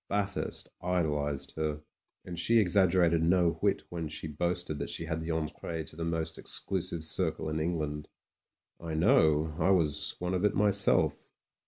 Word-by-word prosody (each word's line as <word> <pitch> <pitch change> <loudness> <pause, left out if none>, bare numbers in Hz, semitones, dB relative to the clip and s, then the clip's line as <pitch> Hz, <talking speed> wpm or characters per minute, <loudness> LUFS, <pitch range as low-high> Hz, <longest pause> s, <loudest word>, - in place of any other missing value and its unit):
Bathurst 100 -1 -1
idolised 75 -6 -1
her, 75 -1 -1 0.5
and 85 -2 -5
she 115 +6 +3
exaggerated 90 -4 +4
no 85 +1 +3
whit - - +1
when 85 -2 -4
she 75 - -6
boasted 85 0 -2
that - - -3
she 80 - -4
had 80 0 -2
the 80 +1 -5
entree 80 0 -3
to 80 - -9
the 85 - -4
most 80 -1 -2
exclusive 90 -4 -3
circle 80 -1 0
in 80 0 -2
England. 75 -2 -2 0.7
I 80 -2 -5
know; 80 -1 +3
I 85 - +3
was 85 -6 +2
one 90 +1 -2
of 90 +1 0
it 105 0 +2
myself. 100 -1 +2
85 Hz, 160 wpm, -30 LUFS, 80-90 Hz, 0.7 s, exaggerated